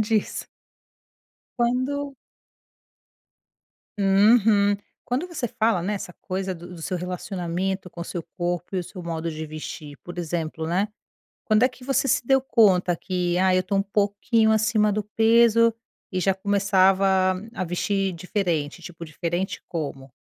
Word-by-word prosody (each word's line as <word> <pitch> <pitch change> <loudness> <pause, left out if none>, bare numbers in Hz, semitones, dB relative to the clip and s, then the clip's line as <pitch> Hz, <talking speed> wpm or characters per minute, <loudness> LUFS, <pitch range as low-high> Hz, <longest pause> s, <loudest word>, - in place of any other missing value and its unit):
disso. 215 -1 0 1.1
Quando 265 +3 0 1.8
Uhum. 205 +1 +4 0.3
Quando 270 +9 -2
você 290 -8 -3
fala 220 -3 +1
nessa 195 -2 -3
coisa 190 0 -3
do 175 +1 -10
do 165 - -10
seu 185 - -2
relacionamento 180 +1 -3
com 175 - -11
o 170 - -3
seu 175 - -5
corpo 175 +1 -2
e 185 - +1
o - - -4
seu 185 - -9
modo 165 -1 -3
de 155 0 -5
vestir, 150 -1 -8
por 175 0 -9
exemplo, 160 -1 -3
né, 185 +5 +1 0.6
quando 215 +1 +3
é 255 - +6
que 255 0 -15
você 275 0 +1
se 240 0 +1
deu 270 -1 +4
conta 190 -9 +3
que 180 -1 -1
"Ai, 185 0 +4
eu 185 - +1
tô 195 +2 -1
um 195 - +3
pouquinho 205 +3 +1
acima 220 -1 +3
do 210 0 -1
peso", 230 +1 +4 0.4
e 185 - -2
já 190 +1 +2
começava 190 -1 +3 0.2
a 185 - -2
vestir 195 +2 -1
diferente, 175 -3 -2
tipo, 170 -1 -9
diferente 175 +4 -3
como? 140 -5 -5
190 Hz, 150 wpm, -24 LUFS, 175-215 Hz, 1.8 s, é